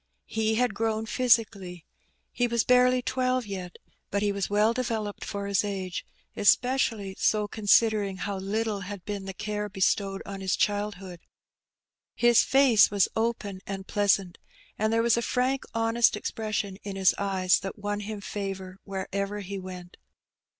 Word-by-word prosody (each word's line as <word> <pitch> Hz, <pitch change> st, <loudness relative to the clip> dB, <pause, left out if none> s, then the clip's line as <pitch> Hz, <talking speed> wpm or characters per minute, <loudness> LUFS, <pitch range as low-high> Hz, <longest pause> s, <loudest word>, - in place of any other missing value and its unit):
He 220 Hz, 0 st, 0 dB
had 245 Hz, -1 st, +1 dB
grown 220 Hz, +1 st, -1 dB
physically. 215 Hz, -8 st, +1 dB, 0.5 s
He 245 Hz, -, +1 dB
was 235 Hz, -1 st, +1 dB
bai'ely 250 Hz, 0 st, +4 dB
twelve 255 Hz, -1 st, 0 dB
yet, 185 Hz, -3 st, -6 dB, 0.3 s
but 200 Hz, +1 st, -1 dB
he 205 Hz, -, +2 dB
was 200 Hz, -1 st, -2 dB
well 210 Hz, +2 st, +3 dB
developed 225 Hz, -4 st, -3 dB
for 200 Hz, 0 st, -4 dB
his 200 Hz, 0 st, +1 dB
age; 190 Hz, -3 st, -4 dB, 0.3 s
espe 205 Hz, -, +5 dB, 0.2 s
cially 205 Hz, -7 st, -2 dB
so 210 Hz, -1 st, +2 dB
considering 210 Hz, -1 st, +2 dB
how 200 Hz, +1 st, -3 dB
little 210 Hz, +2 st, -2 dB
had 195 Hz, -1 st, -8 dB
been 205 Hz, -2 st, -4 dB
the 195 Hz, -, -5 dB
care 210 Hz, 0 st, -3 dB
bestowed 195 Hz, 0 st, 0 dB
on 195 Hz, -1 st, -7 dB
his 190 Hz, -1 st, 0 dB
childhood. 205 Hz, -3 st, -2 dB, 1.0 s
His 240 Hz, -1 st, +5 dB
face 265 Hz, -6 st, +5 dB
was 205 Hz, -2 st, +2 dB
open 220 Hz, -4 st, -2 dB
and 195 Hz, -1 st, -5 dB
pleasant, 195 Hz, -3 st, +1 dB, 0.4 s
and 215 Hz, +1 st, 0 dB
there 230 Hz, 0 st, +2 dB
was 235 Hz, -1 st, +3 dB
a -, -, +1 dB
frank 255 Hz, +3 st, 0 dB
honest 230 Hz, 0 st, +3 dB
expression 210 Hz, -2 st, -3 dB
in 200 Hz, -1 st, -6 dB
his 190 Hz, -1 st, +4 dB
eyes 190 Hz, -2 st, +2 dB
that 195 Hz, +1 st, -6 dB
won 205 Hz, 0 st, -3 dB
him 210 Hz, 0 st, -6 dB
favour 195 Hz, -2 st, -5 dB
wherever 200 Hz, +1 st, -3 dB
he 200 Hz, 0 st, -5 dB
went. 180 Hz, -1 st, -9 dB
205 Hz, 155 wpm, -27 LUFS, 195-225 Hz, 1.0 s, espe